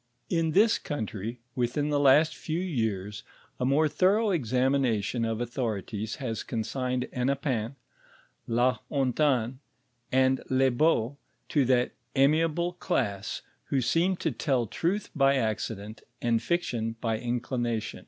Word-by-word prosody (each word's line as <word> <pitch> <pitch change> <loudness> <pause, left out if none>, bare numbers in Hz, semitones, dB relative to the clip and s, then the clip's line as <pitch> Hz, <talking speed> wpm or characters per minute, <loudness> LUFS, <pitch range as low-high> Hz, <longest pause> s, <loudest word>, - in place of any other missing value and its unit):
In 165 -3 +1
this 215 +4 +4
country, 115 -3 -5
within 125 +4 0
the 145 -1 +2
last 145 +3 +5
few 160 +1 -3
years 110 - -2 0.4
a 125 - 0
more 145 +4 +3
thorough 200 +7 +2
examination 125 - +1
of 115 -1 -1
authorities 110 -3 -3
has 115 -5 -4
consigned 125 +2 -2
Hennepin,* 130 -2 -1 0.7
Lu 120 +2 +3 0.2
Hontan, 130 -3 +1 0.5
and 130 0 +3
Lebeau, 130 0 +2 0.3
to 145 -4 +3
that 125 -1 +2 0.2
amiable 160 +5 +2
class 115 - -2 0.2
who 140 - 0
seem 165 +10 +2
to 165 -2 -1
tell 130 -1 0
truth 180 - -2
by 135 -1 +4
accident 110 -3 -3 0.2
and 115 -2 +1
fiction 120 -8 -1
by 115 -2 -1
inclination. 120 -1 -2
130 Hz, 120 wpm, -28 LUFS, 115-150 Hz, 0.7 s, last